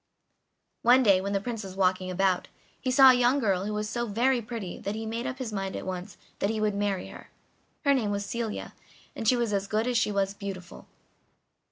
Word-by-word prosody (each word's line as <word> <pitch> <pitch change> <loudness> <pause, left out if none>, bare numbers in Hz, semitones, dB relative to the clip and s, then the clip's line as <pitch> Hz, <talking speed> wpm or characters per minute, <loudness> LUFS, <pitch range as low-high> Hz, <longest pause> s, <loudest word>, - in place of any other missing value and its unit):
One 250 +2 +6
day, 195 -4 +5
when 200 +1 -3
the 195 - +2
Prince 225 +1 -5
was 190 -1 -8
walking 185 -1 +1
about, 185 0 +1 0.3
he 260 - -1
saw 265 0 +8
a - - +4
young 250 +2 +3
girl 195 -7 +1
who 210 - -3
was 210 0 -2
so 240 +2 -2
very 240 +4 +2
pretty 220 -5 -6
that 200 +2 -4
he 220 0 -4
made 230 +3 -3
up 265 -1 -4
his 250 -5 -5
mind 195 -1 -3
at - - -5
once 185 +2 -5 0.2
that 200 - +1
he 220 0 -1
would 215 -1 +1
marry 200 -2 -1
her. - - -12 0.6
Her 280 - +5
name 235 -6 +1
was 200 0 -2
Celia, 230 0 -4 0.4
and 225 - -3
she 250 - +5
was 235 -3 0
as 200 0 0
good 215 +2 0
as 245 -2 +2
she 210 - +1
was 195 -1 0
beautiful. 195 -3 -8
210 Hz, 225 wpm, -28 LUFS, 195-240 Hz, 0.6 s, saw